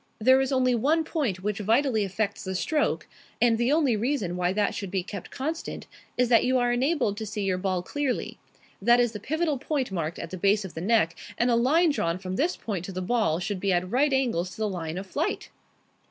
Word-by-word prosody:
There 260 +4 +5
is 265 0 -1
only 255 -1 +3
one 295 +8 +2
point 245 - -2
which 210 0 -2
vitally 225 +2 +2
affects 200 +2 -2
the 190 0 -4
stroke, 300 - 0 0.3
and 230 -2 +3
the 240 +3 +2
only 290 -6 +3
reason 215 -6 -1
why 180 0 +1
that 205 +1 0
should 195 - -5
be 190 -1 -1
kept 195 0 -7
constant 315 +5 -4 0.3
is 250 0 +3
that 230 -2 +5
you 255 +1 +2
are 245 -1 +2
enabled 250 -5 +1
to 220 - -4
see 210 0 -3
your 185 -2 0
ball 185 -2 -1
clearly. 280 +4 -3 0.4
That 240 +1 +5
is 240 -2 +2
the 210 - -6
pivotal 310 - -1
point 280 -4 -2
marked 165 -3 -3
at 165 - -7
the 185 - -5
base 200 +2 +2
of 185 - -8
the 160 - -6
neck, 190 -4 +2 0.2
and 240 +1 +2
a - - +4
line 305 +8 +4
drawn 170 -10 -1
from 185 0 -5
this 325 - 0
point 195 -6 -4
to 195 - -6
the 185 - -4
ball 215 -6 +1
should 190 +1 -3
be 195 +1 0
at 180 +1 0
right 280 +4 +3
angles 235 -10 +1
to 185 - -12
the 215 -1 0
line 170 -4 -4
of 190 - -5
flight." 290 - -3
220 Hz, 230 wpm, -26 LUFS, 190-265 Hz, 0.4 s, There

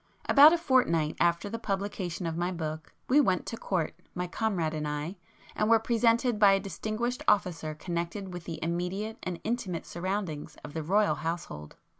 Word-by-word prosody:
About 295 +2 +9
a 345 - +3
fortnight 245 - +2
after 170 +3 +2
the 230 +3 -4
publication 195 -4 -3
of 165 -1 -2
my 175 +2 -1
book, 155 -2 -5 0.2
we 285 +4 +5
went 185 -9 +1
to - - -4
Court, 185 -7 -2 0.2
my 180 0 -2
comrade 175 -4 -1
and 150 -1 -2
I, 150 +6 -4 0.4
and 215 - +1
were 230 - +7
presented 230 0 +2
by 200 -2 +7
a 195 - +3
distinguished 215 +5 -3
officer 175 -6 +1
connected 175 +3 -4
with 175 -1 -7
the 165 - -5
immediate 180 +6 -2
and 180 -2 -4
intimate 210 -7 -2
surroundings 180 -3 -4
of 145 - -9
the 160 - -3
Royal 200 +7 +3
household. 160 - -5
185 Hz, 175 wpm, -29 LUFS, 165-215 Hz, 0.4 s, About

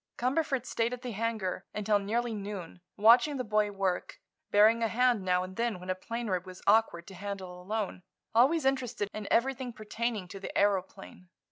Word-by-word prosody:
Cumberford 265 0 0
stayed 230 0 -1
at 250 +1 -7
the 250 - -4
hangar 215 -4 -2
until 210 0 +2
nearly 230 +4 -1
noon, 200 -4 -6 0.2
watching 240 +7 +6
the 255 - -2
boy 210 -2 +1
work, 195 -3 -2 0.3
bearing 215 +3 +5
a 225 - +3
hand 245 -1 +2
now 180 -1 +1
and 185 0 -8
then 230 -5 -1
when 180 +1 -4
a - - +2
plane 230 +6 -5
rib 185 -3 -1
was 185 0 -10
awkward 205 -5 +3
to 195 - -11
handle 185 -2 -6
alone, 205 0 -3 0.3
always 265 +7 +4
interested 250 -6 0
in 215 -1 -5
everything 260 +1 +1
pertaining 215 -2 -3
to 195 +1 -8
the 195 - -6
aëroplane. 195 -2 -1
215 Hz, 180 wpm, -30 LUFS, 190-235 Hz, 0.3 s, watching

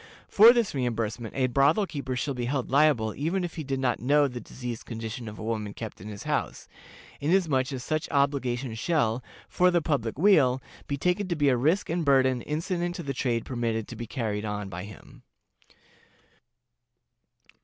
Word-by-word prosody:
For 220 +3 +8
this 235 -4 +1
reimbursement 115 -3 -2
a 135 -1 +2
brothel 140 - +3
keeper 140 -7 -4
shall 140 +3 -2
be 125 -2 -3
held 130 0 -2
liable 140 -7 +3
even 170 +6 -1
if 175 - -4
he 160 - -5
did 135 -1 -2
not 125 -2 0
know 145 +3 +3
the 125 -2 -6
diseased 120 +1 -7
condition 115 0 -6
of 105 0 -8
a - - -7
woman 110 -2 -3
kept 110 -5 -7
in 105 - -8
his 105 -2 -7
house, - - -2 0.5
inasmuch 150 -4 +1
as 130 -2 -5
such 155 -1 -2
obligation 135 -4 0
shall, 120 -1 0 0.2
for 180 0 +3
the 175 -1 +3
public 140 -9 -1
weal, 145 -8 +4 0.3
be 140 - -2
taken 180 +6 0
to 175 - -1
be 145 -2 +3
a 130 - +3
risk 160 +11 +1
and 170 +1 -1
burden 130 -3 +3
incident 175 - -2
to 175 - -5
the 140 -2 -3
trade 120 -3 -1
permitted 115 -3 -2
to - - -7
be 120 - -6
carried 110 -3 -3
on 105 -2 -4
by 90 +1 -6
him. 105 -2 -13
130 Hz, 185 wpm, -27 LUFS, 115-155 Hz, 0.5 s, For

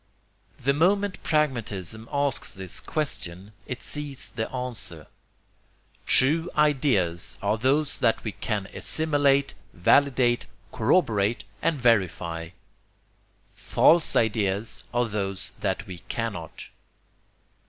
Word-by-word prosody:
The 140 +3 +1
moment 195 +6 +1
pragmatism 115 - -2
asks 140 -2 0
this 95 -2 -1
question, 100 - -3 0.2
it 125 - -6
sees 145 -3 -4
the 110 -2 -4
answer: 120 - -4 1.0
TRUE 160 +6 +5
IDEAS 130 - +1
ARE 110 - +1
THOSE 140 +5 +1
THAT 115 -2 +2
WE 110 - -3
CAN 105 -2 -3
ASSIMILATE, 145 -3 +2 0.2
VALIDATE, 125 +4 +3 0.2
CORROBORATE 110 - +1 0.2
AND 155 -4 0
VERIFY. 90 -7 0 1.0
FALSE 170 -1 +3
IDEAS 105 -1 0
ARE 120 0 +1
THOSE 100 -3 -3
THAT 95 +3 -2
WE 90 -4 -8
CANNOT. 105 -9 -5
120 Hz, 100 wpm, -26 LUFS, 100-145 Hz, 1.0 s, TRUE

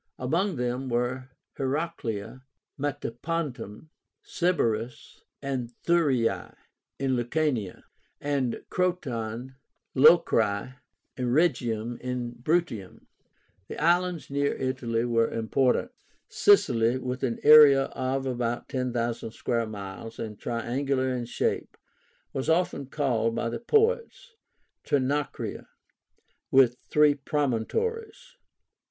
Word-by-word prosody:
Among 170 +9 0
them 125 +1 -2
were 125 +2 -1 0.3
Heracléa, 130 -6 -3 0.3
Metapontum, 145 -2 -4 0.3
Sybaris, 120 -10 -1 0.2
and 130 -4 -3
Thurii, 145 -9 +1 0.4
in 135 -1 0
Lucania; 120 - -1 0.4
and 140 -4 -1
Croton, 130 - -2 0.4
Locri, 130 -7 +4 0.4
and 125 -1 -1
Rhegium, 120 -8 0
in 125 -1 -4
Bruttium. 120 - -2 0.6
The - - -7
islands 175 -1 +1
near 140 0 0
Italy 125 -3 -1
were 115 -1 +2
important. 125 - +1 0.4
SICILY, 120 - +4
with 130 0 -4
an 120 -3 -1
area 145 -2 +9
of 135 0 -2
about 120 -2 -2
10,000 120 -3 -2
square 115 0 -2
miles, 105 +1 -8
and 105 -2 -6
triangular 130 +3 -1
in 125 -1 -3
shape, 115 - -2 0.6
was 135 +3 -2
often 160 -4 +1
called 120 -6 0
by 115 - -1
the 115 - -4
poets 455 - +1 0.5
TRINACRIA 145 +1 -1 0.8
(with 130 -2 +4
three 150 -1 +5
promontories). 425 - -2
130 Hz, 95 wpm, -27 LUFS, 120-150 Hz, 0.8 s, area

